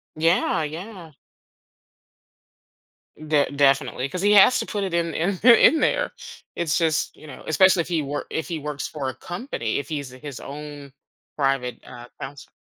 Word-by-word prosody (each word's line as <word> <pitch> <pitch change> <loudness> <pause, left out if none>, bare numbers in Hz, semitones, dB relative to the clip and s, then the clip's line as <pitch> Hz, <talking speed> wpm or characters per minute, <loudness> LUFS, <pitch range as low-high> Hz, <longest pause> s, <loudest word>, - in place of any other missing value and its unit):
Yeah, 165 0 +2
yeah. 170 +2 -8 2.1
De 150 -2 +1
definitely 135 -2 +1
'cause 180 +4 -4
he 205 - +4
has 205 +5 +7
to - - -2
put 205 -2 -3
it 190 - -3
in 170 -1 0
in 180 +4 -1
in 255 +6 +7
there. - - +1 0.4
It's 165 -3 0
just, 160 -2 0
you 155 - -14
know, 140 - -11
especially 185 +2 +4
if - - -6
he 165 -3 0
work 145 +1 -4
if 160 - -3
he 170 -3 -3
works 150 -1 -5
for 145 -4 -5
a - - -5
company, 175 - -4
if 140 -1 -4
he's 145 -4 -4
his 130 +1 -9
own 145 -1 -9 0.4
private, 135 -4 -1
uh, 120 -1 -11
counselor. 140 +1 -9
155 Hz, 165 wpm, -23 LUFS, 140-175 Hz, 2.1 s, has